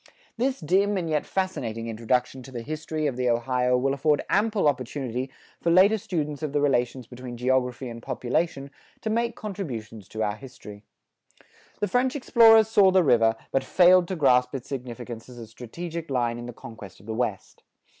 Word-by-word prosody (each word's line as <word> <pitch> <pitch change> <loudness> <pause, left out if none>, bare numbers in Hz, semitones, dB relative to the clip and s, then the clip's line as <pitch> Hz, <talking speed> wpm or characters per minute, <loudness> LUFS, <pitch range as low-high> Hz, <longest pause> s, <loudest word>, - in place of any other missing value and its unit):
This 260 +3 -1
dim 195 +5 +2
and 175 -3 -2
yet 155 -2 -1
fascinating 120 - -3
introduction 125 +3 -1
to 130 - -12
the 120 -2 -6
history 155 +2 -4
of 135 -4 -1
the 125 -1 +1
Ohio 125 +1 +1
will 135 +2 +1
afford 145 +1 +1
ample 210 -4 +2
opportunity 130 -1 -2 0.3
for 170 - +1
later 195 +5 +5
students 150 -6 -3
of 150 -3 -3
the 145 - +2
relations 130 -3 0
between 125 0 -9
geography 125 0 0
and 115 -1 -8
population 135 +3 -2 0.3
to 220 - -2
make 235 +1 0
contributions 120 - -6
to 110 +1 -3
our 105 -1 -1
history. 105 -6 -11 1.0
The 205 - +1
French 250 +7 +1
explorers 225 -5 +6
saw 205 -3 +5
the 185 -1 +4
river, 115 -5 +4 0.2
but 135 - +1
failed 180 -1 +5
to 190 - -3
grasp 125 -4 +3
its 130 -1 -6
significance 120 -3 -7
as 125 - -12
a 115 - -8
strategic 160 +9 -7
line 120 -3 0
in 120 - -7
the - - -6
conquest 110 -5 -11
of 100 - -18
the 110 - -4
West. 110 -4 -3
135 Hz, 180 wpm, -25 LUFS, 120-175 Hz, 1.0 s, explorers